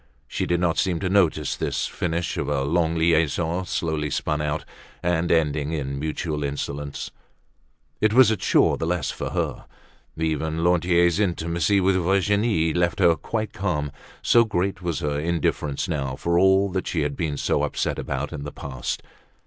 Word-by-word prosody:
She - - -2
did 85 0 +1
not 85 -2 +1
seem 90 -3 +1
to 95 - -1
notice 85 -7 +2
this - - -1
finish 85 0 -2
of - - -2
a 70 -2 0
long 80 +3 +1
liaison 80 +2 +1
slowly 80 -3 -1
spun 75 +2 -1
out, 75 0 -2 0.4
and 85 -1 +1
ending 75 -2 +1
in 70 -3 -3
mutual 75 0 -3
insolence. 70 0 -4 0.9
It 110 0 +3
was 125 -1 +6
a - - +2
chore - - +3
the 80 - -2
less 85 -4 -1
for - - -4
her. - - -3 0.5
Even 80 0 -1
Lantier's 85 0 +3
intimacy 85 0 +1
with 95 0 +3
Virginie 100 -2 +2
left 85 -1 +1
her 85 -1 +5
quite 110 +4 -4
calm, 75 -1 -2 0.3
so 120 - +6
great 95 -3 -1
was 85 -4 -2
her 75 -1 -1
indifference 75 -3 -1
now 70 -4 -2
for 85 +5 +1
all 95 +1 +4
that 95 0 -2
she 80 - -1
had 75 -1 -1
been 75 -3 -2
so - - +1
upset - - -1
about 70 +2 -3
in 70 -2 -5
the 75 - -6
past. 65 -3 -5
80 Hz, 170 wpm, -24 LUFS, 75-90 Hz, 0.9 s, was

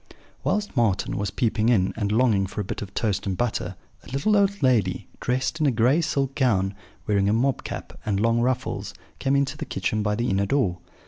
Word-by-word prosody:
"Whilst 210 -5 -1
Marten 110 -6 +1
was 100 0 -1
peeping 115 -1 +1
in, 95 -6 +3
and 105 -2 -1
longing 110 -4 +3
for 100 - -7
a - - 0
bit 95 - -5
of 100 -2 -6
toast 100 -3 -1
and 95 -2 -1
butter, 110 -6 -1 0.3
a - - -13
little 140 +11 +1
old 200 -3 +2
lady, 110 -8 +2
dressed 130 +5 -1
in 155 - +3
a - - +4
gray 125 +7 +3
silk 140 -4 0
gown, 105 -9 +1 0.3
wearing 100 -1 +2
a - - +3
mob 130 +4 +1
cap - - -7
and 100 -2 0
long 115 +2 +2
ruffles, 120 -5 -1 0.2
came 135 0 +1
into 140 -1 +1
the - - -4
kitchen 100 +3 -1
by 105 0 0
the 120 +1 0
inner 100 +1 +1
door. 95 -9 +1
115 Hz, 210 wpm, -25 LUFS, 100-130 Hz, 0.3 s, a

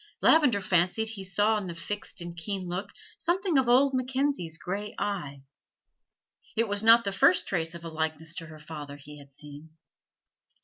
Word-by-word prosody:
Lavender 255 -11 +5
fancied 185 +4 +1
he 210 -3 -6
saw 205 +4 +2
in 195 - -6
the 170 - -6
fixed 195 +2 -5
and 170 0 -6
keen 185 +2 -4
look 185 +3 -4 0.3
something 350 -3 +1
of 255 -2 +1
old 270 +3 +5
Mackenzie's 255 - -1
gray 205 +5 -5
eye: 145 -9 -3 1.1
it 230 0 +1
was 205 0 -1
not 230 +1 +7
the 200 - -1
first 190 -2 +4
trace 165 -2 -1
of 170 0 -9
a - - -4
likeness 160 0 -3
to 165 - -5
her 155 0 -11
father 150 -2 -8
he 150 +1 -12
had 140 -1 -16
seen. 150 +3 -11
185 Hz, 175 wpm, -28 LUFS, 160-220 Hz, 1.1 s, not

